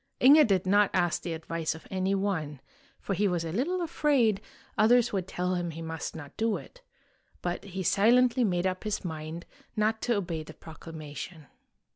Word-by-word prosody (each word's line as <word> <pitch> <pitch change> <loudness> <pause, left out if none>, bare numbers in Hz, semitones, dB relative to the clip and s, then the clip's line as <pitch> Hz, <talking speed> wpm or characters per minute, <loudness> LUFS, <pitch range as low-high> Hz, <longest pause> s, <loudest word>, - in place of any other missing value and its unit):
Inge 290 +2 +8
did 190 -3 +2
not 205 +1 +4
ask 175 -2 +1
the 170 - -3
advice 160 0 -3
of 160 - -12
any 190 +1 0
one, 160 -8 -2 0.4
for 195 - -3
he 205 +2 +2
was 175 -3 -1
a 165 - -3
little 340 - 0
afraid 275 - +2 0.3
others 240 +2 +4
would 190 -2 -1
tell 180 0 -1
him 175 -1 -1
he 165 0 -7
must 160 0 -5
not 145 -3 -9
do 225 -1 +1
it; - - -13 0.6
but 175 0 -2
he 190 -1 -5
silently 245 +7 +4
made 180 -4 +1
up 185 0 -1
his 210 -3 -2
mind 160 0 -5 0.3
not 220 0 +1
to 240 - +1
obey 175 -5 -2
the 155 0 -11
proclamation. 155 0 -9
185 Hz, 180 wpm, -29 LUFS, 165-220 Hz, 0.6 s, Inge